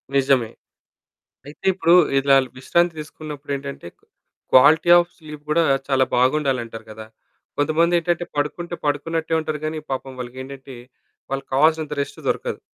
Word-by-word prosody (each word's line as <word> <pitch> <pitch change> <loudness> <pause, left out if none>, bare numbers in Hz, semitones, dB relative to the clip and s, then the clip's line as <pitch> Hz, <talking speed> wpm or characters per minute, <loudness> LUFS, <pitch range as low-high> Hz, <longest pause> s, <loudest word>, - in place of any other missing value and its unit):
నిజమే. 135 -4 +2 1.0
అయితే, 150 +6 -13
ఇప్పుడు 175 -2 +3 0.2
ఇలా 135 0 +4 0.2
విశ్రాంతి 170 +6 +1
తీసుకున్నప్పుడేంటంటే, 140 - -7 0.7
క్వాలిటీ 150 +6 +6
ఆఫ్ 175 0 0
స్లీప్ 150 -2 -11
గూడా 165 +2 +3 0.3
చాలా 135 -1 +3
బాగుండాలంటారు 125 -4 0
కదా! 110 0 -10 0.5
కొంతమందేటంటే, 170 +3 +1
పడుకుంటే 170 +4 -3
పడుకున్నట్టే 160 +3 -1
ఉంటారు 155 -1 -4
గానీ 155 0 -3
పాపం 130 0 -4
వాళ్ళకేంటంటే 130 +1 -8 0.5
వాళ్ళకి 135 0 -4
కావాల్సినంత 155 +1 +2
రెస్ట్ - - -8
దొరకదు. - - -2
145 Hz, 115 wpm, -21 LUFS, 135-160 Hz, 1.0 s, క్వాలిటీ